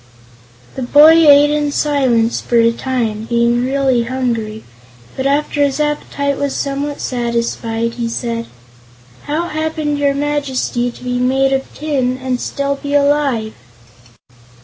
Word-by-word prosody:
The - - -6
boy 290 +5 +7 0.2
ate 290 +1 +6
in 295 -1 0
silence 260 -6 +1
for 240 - -3
a 230 0 +5
time, 230 -3 -3
being 235 +1 +1
really 260 -2 +1
hungry, 230 -4 -3 0.5
but 265 +1 -1
after 290 +1 +1
his 280 0 0
appetite 285 -1 -2
was 285 -1 -2
somewhat 280 +1 -3
satisfied, 235 -1 -2
he 235 -1 -3
said: 230 0 -3 0.8
"How 320 +4 -2
happened 310 -1 -2
your 280 -1 +1
Majesty 280 -4 -1
to 245 - -13
be 250 0 -2
made 270 +2 +2
of 270 0 -2
tin, 265 -4 -1
and 255 -1 -3
still 280 0 -2
be 285 0 -2
alive?" 280 -6 +1
265 Hz, 135 wpm, -16 LUFS, 235-285 Hz, 0.8 s, boy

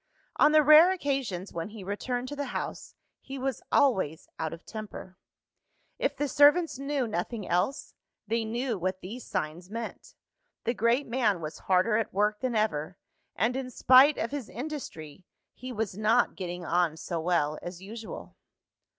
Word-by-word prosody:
On 300 - +6
the 305 0 +6
rare 310 +5 +8
occasions 270 - -2
when 165 +3 -4
he 215 -2 -9
returned 245 +6 -3
to 290 - -5
the 285 0 -3
house, - - -6 0.2
he 270 0 -8
was 265 -2 -2
always 190 - +2
out 160 -1 -2
of 165 +1 -10
temper. 210 -4 -8 0.8
If - - 0
the 290 - 0
servants 290 +2 +4
knew 275 -2 -1
nothing 205 +2 -3
else, 185 - -1 0.3
they 225 +2 0
knew 235 0 -2
what 185 +1 -2
these 225 +7 -8
signs 175 0 -4
meant 230 +1 -7 0.5
the 235 - 0
great 235 +4 +2
man 230 -6 +1
was 155 -1 -6
harder 190 +4 +4
at 225 -4 -2
work 210 +1 +2
than 250 0 -2
ever; 180 -6 -1 0.4
and 225 +6 +1
in 265 -1 -3
spite 260 +4 +6
of 230 - -2
his 280 -6 -5
industry, 230 - -7 0.3
he 255 0 -8
was 220 -5 -3
not 215 +4 +2
getting 175 -1 -5
on 170 -1 +1
so 170 0 -4
well 160 -3 +1
as 175 0 -7
usual. 220 +3 -9
220 Hz, 165 wpm, -28 LUFS, 180-260 Hz, 0.8 s, rare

